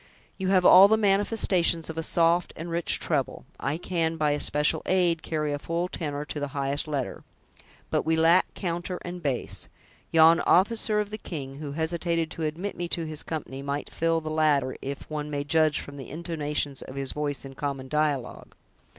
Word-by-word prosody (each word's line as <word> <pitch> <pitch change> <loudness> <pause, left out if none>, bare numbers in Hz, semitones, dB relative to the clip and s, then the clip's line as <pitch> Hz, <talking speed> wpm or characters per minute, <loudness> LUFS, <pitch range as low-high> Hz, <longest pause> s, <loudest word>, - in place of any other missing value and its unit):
You 190 - -1
have 185 -1 +3
all 190 +2 +10
the 220 +2 +3
manifestations 195 -5 +2
of 160 - -6
a 165 - -2
soft 170 +2 +2
and 165 +1 -6
rich 170 0 +2
treble; - - -1
I 140 +4 -1
can, 165 -2 -1
by 150 -2 +2
especial 150 +1 +1
aid, 175 -3 +2
carry 150 -2 -2
a 145 - -3
full 170 +4 -2
tenor 150 -5 -4
to 150 - -5
the 145 - -2
highest 140 +2 -1
letter; 140 -4 -3 0.7
but - - +2
we 160 0 +1
lack 165 +3 +4
counter 175 0 -3
and 175 0 -6
bass! 140 -6 -3 0.4
Yon 165 +1 +6
officer 210 +3 +3
of 210 0 -2
the 215 - -5
king, 135 -8 -6
who 145 -2 -5
hesitated 165 +1 -1
to 160 - -3
admit 170 +7 -3
me 175 0 -3
to 170 -1 0
his 155 -1 -5
company, 140 -4 -5
might 140 +1 -4
fill 165 0 +1
the 155 0 -5
latter, 150 -4 +2
if 140 +1 -6
one 150 -1 -4
may 145 -1 -2
judge 155 0 +2
from 145 0 -9
the 135 - -8
intonations 150 -3 -2
of 130 - -9
his 135 -1 -1
voice 145 -2 -3
in 135 - -9
common 135 -1 -4
dialogue." 150 -3 -2
160 Hz, 190 wpm, -26 LUFS, 145-170 Hz, 0.7 s, all